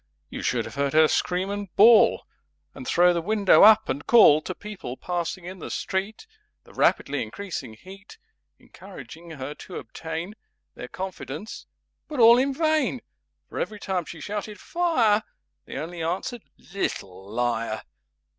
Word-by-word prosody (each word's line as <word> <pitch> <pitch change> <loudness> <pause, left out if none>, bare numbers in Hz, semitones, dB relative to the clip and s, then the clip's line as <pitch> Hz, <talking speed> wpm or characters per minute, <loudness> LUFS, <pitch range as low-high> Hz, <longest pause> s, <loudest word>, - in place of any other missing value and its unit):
You - - -6
should 115 -3 -1
have 115 - -9
heard 140 0 -1
her 155 0 +6
Scream 185 +5 -1
and 205 0 -4
Bawl, 225 +1 +7
[Pg - - -25 0.5
27] - - -16
And 130 - -8
throw 175 +1 +4
the 170 - -1
window 205 +2 +4
up 220 +1 +7
and 140 +3 -3
call 155 -10 +7
To 185 - -6
People 195 -12 -8
passing 175 0 -4
in 185 +1 -8
the - - -7
Street— 190 - -3 0.4
(The - - -18
rapidly - - +1
increasing 175 - -6
Heat 195 - -14 0.4
Encouraging 170 +1 -13
her 145 -2 -6
to 180 - -11
obtain 165 +4 -6 0.4
Their - - -8
confidence)—but 190 - -8
all 235 +1 +8
in 275 +2 +1
vain! 305 -4 0 0.5
For - - -7
every 210 -1 -4
time 185 -4 -2
She 165 - -9
shouted 205 +3 -5
"Fire!" 250 -12 +2 0.4
They - - -8
only 165 +4 -6
answered 185 +8 -3 0.2
"Little 95 - -5
Liar!" 115 -1 -2
185 Hz, 155 wpm, -25 LUFS, 150-215 Hz, 0.5 s, all